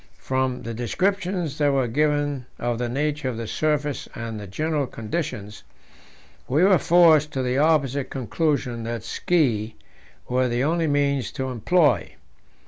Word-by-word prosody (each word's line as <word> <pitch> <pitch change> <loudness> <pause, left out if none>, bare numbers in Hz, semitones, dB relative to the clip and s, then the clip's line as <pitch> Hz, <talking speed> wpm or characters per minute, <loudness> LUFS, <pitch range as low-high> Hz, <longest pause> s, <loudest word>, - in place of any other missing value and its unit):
From 130 -1 -1
the 115 - -5
descriptions 175 - -1
that 145 -1 +3
were 135 -2 +1
given 145 0 0
of 120 -1 -2
the 120 -1 -1
nature 145 +1 -1
of 120 - -4
the 115 - -4
surface 150 +3 -1
and 115 -2 -5
the 105 - -8
general 150 - -1
conditions, 110 -4 -5 0.9
we 145 +7 +2
were 190 -3 +5
forced 160 -3 +5
to 130 - -1
the 125 +1 0
opposite 140 -3 +2
conclusion, 130 -2 -1
that 115 0 -4
ski 115 -11 0 0.5
were 130 +1 +1
the 120 +2 0
only 165 +2 +1
means 140 -5 +1
to 130 -1 -3
employ. 145 - +2
140 Hz, 145 wpm, -24 LUFS, 120-155 Hz, 0.9 s, were